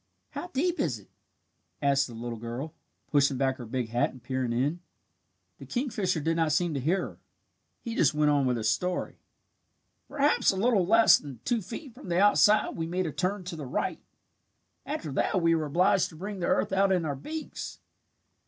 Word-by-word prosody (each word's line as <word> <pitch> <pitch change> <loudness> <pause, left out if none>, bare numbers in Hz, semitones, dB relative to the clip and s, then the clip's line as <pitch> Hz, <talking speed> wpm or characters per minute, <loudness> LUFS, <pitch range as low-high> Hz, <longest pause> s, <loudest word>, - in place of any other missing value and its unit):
"How - - -5
deep 350 +2 -1
is - - 0
it?" - - -19 0.7
asked 140 -1 +2
the 120 - -10
little 115 0 -5
girl, 120 +7 -5 0.4
pushing 140 -2 +3
back 130 0 +1
her 120 - -8
big 125 0 -3
hat 120 +2 +1
and 130 -3 -15
peering 130 -1 -2
in. 140 +8 0 0.8
The - - -10
kingfisher 210 - -1
did 165 +2 0
not 160 -2 +2
seem 170 +1 +1
to 140 - -1
hear 170 +9 +1
her. - - -8 0.6
He 230 - -5
just 150 - +3
went 150 0 +3
on 140 -2 +2
with 125 -1 +1
his 110 -1 -1
story. 180 +12 -1 0.9
"Perhaps 290 0 +2
a - - +2
little 205 -4 +2
less 225 +2 +6
than 140 -5 -10
two 235 -2 +1
feet 235 - -8
from 240 -6 -11
the 170 +1 +2
outside 205 +1 +4
we 165 -1 -3
made 180 +2 -1
a 160 - -2
turn 185 +5 -2
to 175 -1 -6
the 150 -4 -6
right. - - -2 0.9
After 150 - -4
that 185 +7 +1
we 165 -1 +3
were 160 -2 0
obliged 180 +3 +3
to 160 - -14
bring 195 +4 -6
the 175 - -1
earth - - +1
out 195 0 +3
in 180 -3 +1
our 145 -2 -2
beaks. 310 - -6
165 Hz, 200 wpm, -28 LUFS, 135-195 Hz, 0.9 s, less